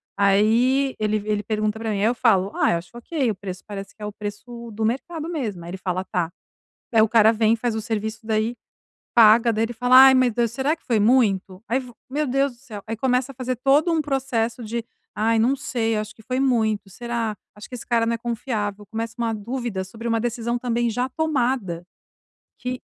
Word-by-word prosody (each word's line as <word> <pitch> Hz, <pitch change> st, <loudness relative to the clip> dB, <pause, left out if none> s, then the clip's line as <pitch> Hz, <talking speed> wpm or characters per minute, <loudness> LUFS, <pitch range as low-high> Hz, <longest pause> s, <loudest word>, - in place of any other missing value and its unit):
Aí 230 Hz, +7 st, +3 dB
ele 215 Hz, 0 st, +1 dB
vi 210 Hz, +1 st, -8 dB
ele 210 Hz, -1 st, 0 dB
pergunta 215 Hz, 0 st, -1 dB
pra 225 Hz, -1 st, -3 dB
mim, 205 Hz, -, -1 dB
aí -, -, 0 dB
eu 235 Hz, +2 st, +2 dB
falo: 200 Hz, -5 st, +3 dB
"Ai, -, -, +3 dB
acho 170 Hz, +1 st, -6 dB
ok. 260 Hz, +2 st, -1 dB
O -, -, -5 dB
preço 185 Hz, -1 st, -7 dB
parece 200 Hz, -1 st, -7 dB
que 215 Hz, -, -20 dB
é -, -, -4 dB
o 210 Hz, -, -5 dB
preço 230 Hz, +3 st, -7 dB
do 220 Hz, +1 st, -2 dB
mercado 305 Hz, +7 st, -2 dB
mesmo". 225 Hz, -, -4 dB
Aí 170 Hz, -, -7 dB
ele 190 Hz, -, -5 dB
fala: 185 Hz, -1 st, -2 dB
"Tá". 175 Hz, -2 st, -2 dB, 0.6 s
Aí 225 Hz, -, +5 dB
o 220 Hz, -, +5 dB
cara 225 Hz, 0 st, +5 dB
vem 225 Hz, 0 st, +3 dB
faz 230 Hz, 0 st, -2 dB
o 220 Hz, -, -2 dB
serviço, 220 Hz, -1 st, -3 dB
daí 220 Hz, +1 st, 0 dB, 0.6 s
paga, 230 Hz, +1 st, +7 dB
daí 220 Hz, 0 st, 0 dB
ele 235 Hz, -, -6 dB
fala: 245 Hz, +2 st, +3 dB
"Ai, 265 Hz, -, +7 dB
mas 255 Hz, -2 st, +3 dB
do 235 Hz, +1 st, +2 dB
será 265 Hz, +7 st, 0 dB
que -, -, -35 dB
foi 230 Hz, -5 st, +2 dB
muito?". 205 Hz, -5 st, +2 dB
Aí 250 Hz, +3 st, +1 dB
vo 250 Hz, -2 st, -10 dB, 0.2 s
meu 295 Hz, +3 st, -1 dB
Deus 275 Hz, +1 st, +1 dB
do 240 Hz, -, -24 dB
céu, 215 Hz, -6 st, -9 dB
aí 225 Hz, -, -3 dB
começa 250 Hz, +3 st, 0 dB
a -, -, -33 dB
fazer 255 Hz, 0 st, -2 dB
todo 280 Hz, +7 st, +3 dB
um 325 Hz, -1 st, +2 dB
processo 255 Hz, -5 st, -1 dB
de: 230 Hz, +1 st, -4 dB, 0.3 s
"Ai, 225 Hz, +1 st, +2 dB
não 245 Hz, +5 st, +3 dB
sei, 230 Hz, -5 st, -1 dB
acho 215 Hz, 0 st, -4 dB
que -, -, -16 dB
foi 255 Hz, +3 st, -2 dB
muito. 220 Hz, -6 st, +1 dB
Será? 230 Hz, +1 st, -3 dB, 0.2 s
Acho 210 Hz, -, -10 dB
que 250 Hz, -, -6 dB
esse 240 Hz, -, -8 dB
cara 235 Hz, -2 st, +2 dB
não 230 Hz, -, 0 dB
é -, -, -1 dB
confiável". 215 Hz, -3 st, -3 dB
Começa 225 Hz, +2 st, -5 dB
uma 230 Hz, -1 st, -1 dB
dúvida 225 Hz, -2 st, -3 dB
sobre 225 Hz, +5 st, -8 dB
uma 230 Hz, -1 st, +1 dB
decisão 235 Hz, 0 st, -2 dB
também 240 Hz, -1 st, 0 dB
já 245 Hz, +3 st, -1 dB
tomada 250 Hz, -, -1 dB, 0.7 s
que 250 Hz, 0 st, -4 dB
230 Hz, 220 wpm, -23 LUFS, 215-250 Hz, 0.7 s, paga